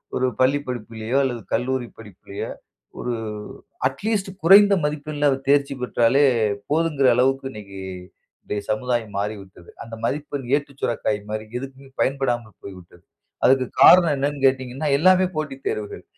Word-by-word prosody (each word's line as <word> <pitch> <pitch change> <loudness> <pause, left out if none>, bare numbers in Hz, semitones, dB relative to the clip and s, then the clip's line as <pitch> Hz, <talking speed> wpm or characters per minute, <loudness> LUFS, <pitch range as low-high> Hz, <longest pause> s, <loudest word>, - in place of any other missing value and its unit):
ஒரு 130 - +1
பள்ளி 135 +3 +3
படிப்பிலயோ 115 0 -3
அல்லது 120 -3 -2
கல்லூரி 125 +1 -1
படிப்பிலயோ! 100 -2 -8 0.5
ஒரு 125 - -2 0.7
அட்லீஸ்ட் 195 +8 -2
குறைந்த 200 +3 +7
மதிப்பெண்ல 150 0 -2 0.2
தேர்ச்சி 140 -1 +3
பெற்றாலே 125 +2 +2 0.5
போதும்ங்கிற 150 -3 +2
அளவுக்கு 135 +2 +1
இன்னக்கி 100 -3 -10 0.6
இன்றைய 105 - -4
சமுதாயம் 115 -2 -2
மாறிவிட்டது. 100 -4 -6
அந்த 115 -1 -9
மதிப்பெண் 145 -1 -3
ஏட்டு 145 -1 -3
சுரைக்காய் 110 -3 -1
மாரி, 110 0 -4
எதுக்குமே 135 0 -10
பயன்படாமல் 120 -5 -1
போய்விட்டது. 90 -3 -12 0.4
அதற்கு 130 -1 +4
காரணம் 175 -4 +8
என்னன்னு 140 0 -2
கேட்டீங்கன்னா, 130 +2 -2
எல்லாமே 185 +3 +4
போட்டி 150 -3 -3
தேர்வுகள். 105 -1 -4
130 Hz, 120 wpm, -22 LUFS, 110-145 Hz, 0.7 s, காரணம்